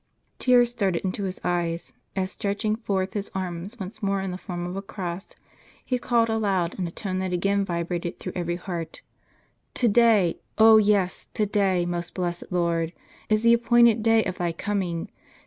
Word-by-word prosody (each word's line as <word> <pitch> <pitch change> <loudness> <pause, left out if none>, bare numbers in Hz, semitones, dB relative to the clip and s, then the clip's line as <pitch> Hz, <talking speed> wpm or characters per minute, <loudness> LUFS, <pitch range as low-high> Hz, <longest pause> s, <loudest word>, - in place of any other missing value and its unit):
Tears 245 -2 +4
started 195 -7 -1
into 195 +2 -2
his 185 -1 -4
eyes, 170 -1 -2 0.2
as 190 0 -1
stretching 210 +1 -1
forth 195 -4 -2
his 205 -1 -3
arms 185 +4 -4
once 195 +3 -7
more 200 -1 0
in 190 -1 -3
the 180 - -4
form 175 -2 -5
of 180 +1 -5
a 195 - -3
cross, 190 -2 -6 0.5
he 250 -1 0
called 235 -2 +2
aloud, 200 -6 0
in 180 - -1
a - - -7
tone 185 0 -3
that 185 -1 -2
again 200 +3 +1
vibrated 170 -1 -3
through - - -5
every 175 -1 -1
heart: 175 -2 -6 0.7
"To 245 - +2
day; 215 -5 +4 0.2
oh 220 0 +8
yes, 205 -3 +2
to 215 - +2
day, 195 -3 +1
most 175 0 -4
blessed 175 -2 -2
Lord, 170 -2 0 0.4
is 215 +1 +2
the 235 0 +6
appointed 235 -1 +5
day 225 0 +4
of 185 0 -4
Thy 175 -1 0
coming. 180 -2 -2
190 Hz, 180 wpm, -25 LUFS, 175-215 Hz, 0.7 s, oh